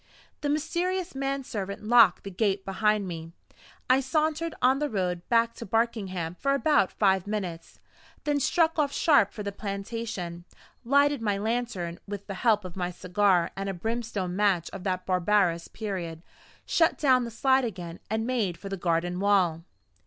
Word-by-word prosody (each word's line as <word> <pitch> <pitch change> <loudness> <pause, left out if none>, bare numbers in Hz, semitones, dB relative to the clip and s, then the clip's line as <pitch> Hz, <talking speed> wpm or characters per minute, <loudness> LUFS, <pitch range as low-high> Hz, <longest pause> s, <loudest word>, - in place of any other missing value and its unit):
The 290 - -1
mysterious 350 +5 -1
man 275 0 -2
servant 200 -5 -5
locked 225 -4 +5
the 195 - -6
gate 195 0 0
behind 210 +1 +1
me. 165 -1 -7 0.5
I 255 +1 +5
sauntered 310 +4 0
on 260 +2 +3
the 295 0 -1
road 180 -4 -1
back 230 0 +3
to - - -8
Barkingham 195 -7 -1
for 275 0 +2
about 290 - +3
five 190 -2 +2
minutes, 185 -6 -5 0.4
then 295 -1 +1
struck 325 +3 +2
off 285 -2 +2
sharp 285 - +4
for 210 - -7
the 200 - -3
plantation, 200 -3 -5 0.4
lighted 280 +1 +3
my 205 -3 0
lantern 210 -6 -2
with 200 0 -6
the 200 - -5
help 215 -4 +3
of 180 - -8
my 180 -2 -2
cigar 180 0 +1
and 195 0 -3
a 195 - -3
brimstone 215 -2 -3
match 190 -4 +1
of 180 - -8
that 185 -1 -1
barbarous 180 -2 +2
period, 175 -6 -5 0.4
shut 330 -1 +2
down 260 -4 +4
the 235 - -4
slide 265 +3 +2
again, 175 -7 -5
and 220 +1 -1
made 225 -9 -1
for 195 +3 -8
the 195 - -3
garden 175 +1 0
wall. 185 -5 +2
205 Hz, 165 wpm, -27 LUFS, 185-255 Hz, 0.5 s, locked